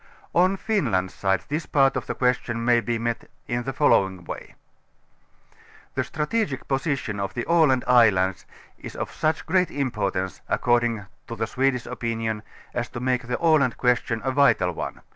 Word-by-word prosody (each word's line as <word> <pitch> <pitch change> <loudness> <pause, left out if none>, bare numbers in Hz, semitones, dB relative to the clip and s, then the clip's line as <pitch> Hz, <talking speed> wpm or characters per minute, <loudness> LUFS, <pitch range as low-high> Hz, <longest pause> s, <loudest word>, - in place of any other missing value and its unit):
On 185 +3 +3
Finland's 115 - 0
side. 95 -1 0
this 155 +2 -3
part 135 -2 +3
of - - -3
the - - -3
question 120 -2 0
may 120 -1 +5
be 120 0 -1
met 115 0 -3 0.2
in 120 0 -1
the 135 - -3
following 95 -11 +2
way: - - -8 1.4
The - - 0
strategic 150 - -2
position 135 -6 -1
of 100 - -3
the 120 - -2
Aland 155 -7 +4
islands 105 -7 +3 0.3
is - - -9
of - - -4
such 155 0 -1
great 180 +1 +2
importance, 100 - -2
according 120 -3 +1 0.2
to 115 - -5
the 110 - -1
Swedish 130 +1 0
opinion, 115 -2 -3 0.3
as 120 0 -2
to 120 - -6
make 125 -1 -1
the 125 - -1
Aland 155 -7 +3
question 125 -2 +1
a 130 - 0
vital 130 -10 +3
one. 85 - -6
120 Hz, 160 wpm, -24 LUFS, 110-140 Hz, 1.4 s, may